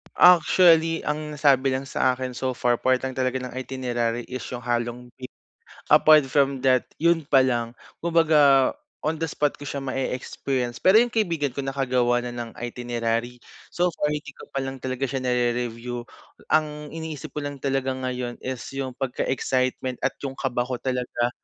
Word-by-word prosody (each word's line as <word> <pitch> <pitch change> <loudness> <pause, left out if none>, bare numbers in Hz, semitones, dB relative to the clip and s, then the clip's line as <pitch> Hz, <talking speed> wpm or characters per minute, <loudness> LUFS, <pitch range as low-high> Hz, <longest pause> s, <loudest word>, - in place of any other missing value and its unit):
Actually 165 -2 +6
ang 150 0 -2
nasabi 135 -2 +4
lang 135 +1 -2
sa 130 - +2
akin 125 0 -4
so 130 +1 -1
far, 120 -1 +1
part 130 +2 +2
lang 130 0 -5
talaga 130 0 0
ng 125 -1 -7
itinerary 120 -2 -2
is 130 0 -6
yung 125 - -4
halong 120 0 -2
e 130 0 -9 0.6
apart 155 -2 +6
from 135 0 +2
that 130 -1 +2
yun 170 +1 +3
pa 140 -2 +3
lang. 120 -3 +1 0.3
Kumbaga 155 -5 +4 0.3
on 155 +2 +1
the 165 - -1
spot 150 -1 0
ko - - -14
siya 140 - -4
ma-eexperience. 130 -1 -3
Pero 190 +3 +6
yung 240 0 +2
kaibigan 165 - 0
ko 140 - -3
nakagawa 125 -3 +1
na 120 - -5
ng 120 -1 -5
itinerary. 120 0 -3 0.3
So 175 - +1
far 150 - 0
hindi 150 -2 -5
ko - - -14
pa - - -3
lang 135 -1 -5
talaga 130 +1 -2
siya 130 0 -3
narere-review. 120 -1 -1 0.5
Ang 150 -1 0
iniisip 160 -3 -6
ko - - -6
lang 145 -2 -7
talaga 135 -1 0
ngayon 125 -2 -4
is 130 -2 -4
yung 135 -1 -3
pagka-excitement 130 -1 -1
at - - -1
yung 135 -1 -3
kaba 125 -2 -1
ko 125 -1 -4
talaga, 125 -2 -1
130 Hz, 170 wpm, -24 LUFS, 125-145 Hz, 0.6 s, Actually